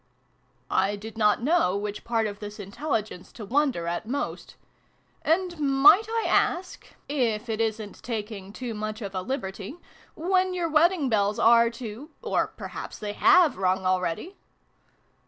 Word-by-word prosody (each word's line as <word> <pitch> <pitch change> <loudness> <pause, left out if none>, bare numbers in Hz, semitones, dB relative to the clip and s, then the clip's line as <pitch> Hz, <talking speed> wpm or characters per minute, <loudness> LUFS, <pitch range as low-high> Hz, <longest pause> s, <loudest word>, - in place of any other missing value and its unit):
I 195 +2 +2
did 220 +2 -9
not 215 +1 +2
know 275 - +2
which 205 0 -5
part 230 -2 0
of 205 -1 -5
this 210 0 -8
intelligence 210 -2 -4
to 220 - -8
wonder 265 - +1
at 175 +5 -3
most. 280 +4 -4 0.3
" - - -40 0.3
And 345 +1 0
might 290 +9 +6
I 455 0 -1
ask 360 +1 0 0.2
if 240 -6 -1
it 220 0 -1
isn't 220 -2 -3
taking 210 -4 -5
too 240 +2 -5
much 215 +1 -5
of 200 -1 -6
a 185 - -2
liberty 195 - -5 0.4
when 370 +2 +1
your 345 -2 -1
wedding 320 -1 +3
bells 210 -3 +1
are 235 0 +5
to 235 +4 -8
or - - +1
perhaps - - -8
they 210 -1 -5
have 365 - +5
rung, 185 0 +1
already 185 - -1
225 Hz, 155 wpm, -26 LUFS, 205-295 Hz, 0.4 s, might